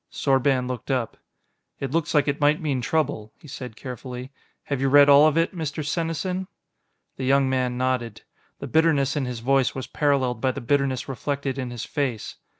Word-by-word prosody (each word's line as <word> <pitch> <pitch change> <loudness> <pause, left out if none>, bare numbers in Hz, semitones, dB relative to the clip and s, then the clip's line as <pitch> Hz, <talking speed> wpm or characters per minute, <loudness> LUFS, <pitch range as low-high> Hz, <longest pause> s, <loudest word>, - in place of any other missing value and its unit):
Sorban 135 -2 +1
looked 125 0 -6
up. 125 -4 -1 0.6
"It 135 -2 -4
looks 165 +1 -1
like 145 -1 +3
it 140 +1 -1
might 150 +1 +4
mean 140 -6 -1
trouble," 140 -7 -1
he - - -15
said 125 -4 -8
carefully. 125 +1 -7 0.3
"Have 140 -2 -3
you 135 - +2
read 145 +1 +7
all 145 +2 +8
of 155 0 +1
it, 165 +3 +1
Mr. 155 -2 -4
Senesin?" 170 +4 -2 0.7
The 130 - -4
young 135 +1 +3
man 125 -1 0
nodded. 125 -3 -2 0.3
The - - -7
bitterness 155 -4 +2
in 145 -3 -1
his 125 -2 -5
voice 135 +1 +2
was 130 - -4
paralleled 130 -5 0
by 130 -1 +1
the 140 - -5
bitterness 135 0 0
reflected 140 0 -3
in 130 -2 -3
his 120 -2 -6
face. 130 -7 -3
135 Hz, 185 wpm, -24 LUFS, 125-145 Hz, 0.7 s, all